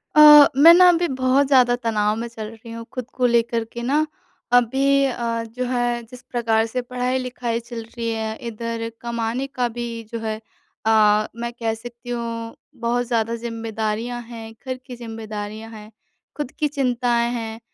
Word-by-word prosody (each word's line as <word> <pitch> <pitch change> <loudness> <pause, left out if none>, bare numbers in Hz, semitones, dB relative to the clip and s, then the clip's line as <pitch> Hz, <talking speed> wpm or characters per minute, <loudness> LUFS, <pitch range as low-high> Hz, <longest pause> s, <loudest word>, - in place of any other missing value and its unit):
अ, 300 -1 +10
मैं 325 +4 +10
ना 360 +1 +7
अभी 345 0 +3
बहुत 260 0 +2
ज़्यादा 250 -3 +5
तनाव 215 -3 0
में 235 - -3
चल 225 -2 -7
रही 225 +1 -11
हूँ 230 0 -7
खुद 255 -2 -5
को 255 - +1
लेकर 235 -1 +2
के 235 - -5
ना, 285 +6 +2 0.5
अभी 270 +3 +4
अ, 235 -3 -2
जो 235 +3 -5
है 240 -1 0
जिस 245 +2 -13
प्रकार 225 -2 +2
से 250 +3 -3
पढ़ाई-लिखाई 250 -1 -2
चल 235 -1 -7
रही 230 +1 -5
है 220 0 -3
इधर 230 0 -4
कमाने 235 +2 -2
का 255 -3 -1
भी 240 0 -2 0.2
जो 230 - -3
है 220 -1 -2 0.5
अ, 215 -1 +4
मैं 235 0 -4
कह 230 -2 -2
सकती 240 +2 -10
हूँ 230 -1 -4 0.3
बहुत 240 +1 0
ज़्यादा 230 -1 0
ज़िम्मेदारियाँ 230 0 -3
हैं, 230 -1 -9
घर 255 -1 -3
की 250 - -8
ज़िम्मेदारियाँ 220 -2 -7
हैं, 215 -1 -11 0.5
खुद 295 -3 -3
की 300 - +2
चिंताएँ 245 -4 +1
हैं। 225 -2 -5
235 Hz, 170 wpm, -22 LUFS, 225-250 Hz, 0.5 s, अ